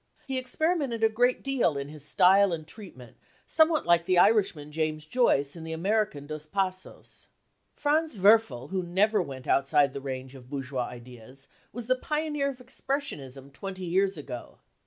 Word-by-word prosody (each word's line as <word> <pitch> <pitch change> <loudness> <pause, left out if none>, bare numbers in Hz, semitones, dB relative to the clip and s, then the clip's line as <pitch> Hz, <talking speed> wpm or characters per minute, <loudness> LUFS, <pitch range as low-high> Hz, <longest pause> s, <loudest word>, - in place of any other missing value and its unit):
He 265 -2 -2
experimented 270 -3 -1
a 220 - +6
great' 245 +3 +2
1 - - -24
deal 260 - +1
in 140 0 -5
his 150 -1 -9
style 190 +5 +5
and 160 -2 -4
treatment, 155 - -12 0.3
somewhat 315 -1 +3
like 170 -1 +4
the 185 -1 +3
Irishman 180 -7 +3
James 155 0 -2
Joyce 155 - +2
and 165 - -8
the 160 0 -5
American 195 -3 -1
Dos 155 0 -6
Passos. 185 +1 -4 0.5
Franz 305 -3 0
Werfel, 190 - +4
who 190 -1 0
never 195 +4 +2
went 135 -6 -7
outside 140 0 +3
the 140 - -5
range 130 -1 -6
of 125 -2 -13
bourgeois 135 -3 -3
ideas, 125 +2 -11 0.2
was 240 0 -6
the 255 +2 +2
pioneer 300 +1 -1
of 270 - -7
expressionism 150 - -5
twenty 190 +4 -6
years 190 +2 +1
ago. 130 -5 -8
180 Hz, 165 wpm, -28 LUFS, 140-225 Hz, 0.5 s, a